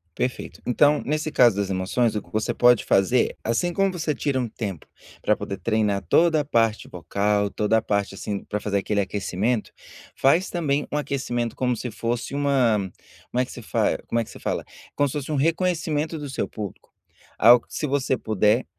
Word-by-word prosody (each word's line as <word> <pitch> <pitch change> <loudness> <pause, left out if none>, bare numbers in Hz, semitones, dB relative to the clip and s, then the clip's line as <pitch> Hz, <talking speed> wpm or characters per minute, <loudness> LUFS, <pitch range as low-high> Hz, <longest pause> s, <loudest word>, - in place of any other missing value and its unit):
Perfeito, 125 0 -3
então 145 +4 +3
nesse 155 +1 -1
caso 120 -7 +5
das 100 -1 -1
emoções 100 +5 0
o 105 - -1
que - - -20
você 110 +2 -1
pode 120 -2 +5
fazer, 100 +6 +2
assim 115 +10 0
como 195 +2 +2
você 160 -3 -1
tira 140 -1 -1
um 120 - -2
tempo 100 -9 -5 0.4
para - - +2
poder 100 - -4
treinar 105 0 0
toda 165 -2 +4
a - - -6
parte 115 -5 +1
bocal, 100 +3 0
toda 105 +2 +1
a 110 - +1
parte 100 -2 -1
assim 100 0 -4
para 105 - -3
fazer 100 -1 -1
aquele 100 +1 -1
aquecimento, 105 +3 -1 0.4
faz 165 +8 +3
também 150 -4 0
um 150 - -1
aquecimento 120 -5 -2
como 125 -2 0
se 125 - -4
fosse 120 +3 -3
uma, 125 -9 +2 0.4
como 125 - 0
é 130 - +2
que - - -11
se 120 - -9
fa - - 0
como 115 - 0
é - - +1
que - - -16
se - - -11
fala, - - -2 0.3
como 145 - +3
se 130 - -6
fosse 145 +1 -4
um - - 0
reconhecimento 160 0 0
do 145 -1 -6
seu 135 - -2
público. 105 -4 -8 0.5
Algo 120 +2 +7
que - - -18
se 150 - -2
você 135 -2 0
puder, 110 +3 +2
120 Hz, 200 wpm, -24 LUFS, 105-145 Hz, 0.5 s, Algo